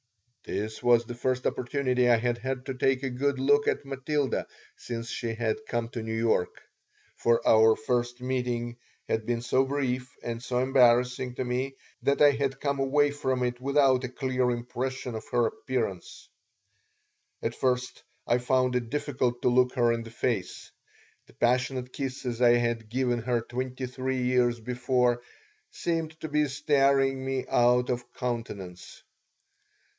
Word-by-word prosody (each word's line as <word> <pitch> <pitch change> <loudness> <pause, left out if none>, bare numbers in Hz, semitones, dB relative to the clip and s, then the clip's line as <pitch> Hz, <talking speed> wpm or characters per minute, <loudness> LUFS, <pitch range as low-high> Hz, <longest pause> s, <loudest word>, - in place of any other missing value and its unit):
This 110 +1 -4
was 120 -1 +4
the 120 - -6
first 130 +1 -1
opportunity 125 -1 +1
I 120 - +6
had 120 +1 -1
had 130 +1 -4
to 135 - -3
take 130 +1 +1
a 135 - -1
good 140 +2 0
look 145 +2 +3
at - - 0
Matilda 135 0 -1 0.3
since 115 -1 -6
she 115 -1 -3
had 115 -1 0
come 120 -1 -2
to 120 - -5
New 110 0 -3
York; 115 -5 0 0.5
for 115 0 +1
our 110 0 +6
first 120 +1 -1
meeting 125 -2 -2 0.3
had 110 -1 -1
been 120 -1 -1
so 130 +2 +3
brief 130 -2 -2
and 115 -1 -4
so 125 - -2
embarrassing 125 -1 +3
to 130 - -2
me 130 +2 -2 0.3
that 140 - +1
I 145 - +8
had 135 -1 -2
come 140 -1 -1
away 145 +2 +3
from 130 -3 -1
it 125 0 -2
without 135 -1 +3
a 130 - -3
clear 130 -1 0
impression 125 +1 -3
of 110 0 -6
her 120 -1 +2
appearance 115 -6 -4 1.2
At - - -1
first 125 -1 -1 0.2
I 120 - +2
found 125 0 +1
it 120 -2 -1
difficult 125 -4 -1
to - - +4
look 125 0 +3
her 120 -2 +3
in 115 - -2
the 115 - -9
face. 115 -6 -3 0.6
The - - -19
passionate 125 +1 0
kisses 130 -3 -4
I 120 -1 +7
had 120 -2 -1
given 125 0 0
her 120 0 0
twenty 130 +2 -4
three 130 0 -2
years 125 -1 +2
before 125 +1 +1 0.5
seemed 160 -2 -3
to - - -3
be 150 0 +1
staring 135 -1 +2
me 135 -1 -2
out 125 +1 +3
of 120 0 -4
countenance. 110 -8 -5
125 Hz, 160 wpm, -28 LUFS, 120-130 Hz, 1.2 s, I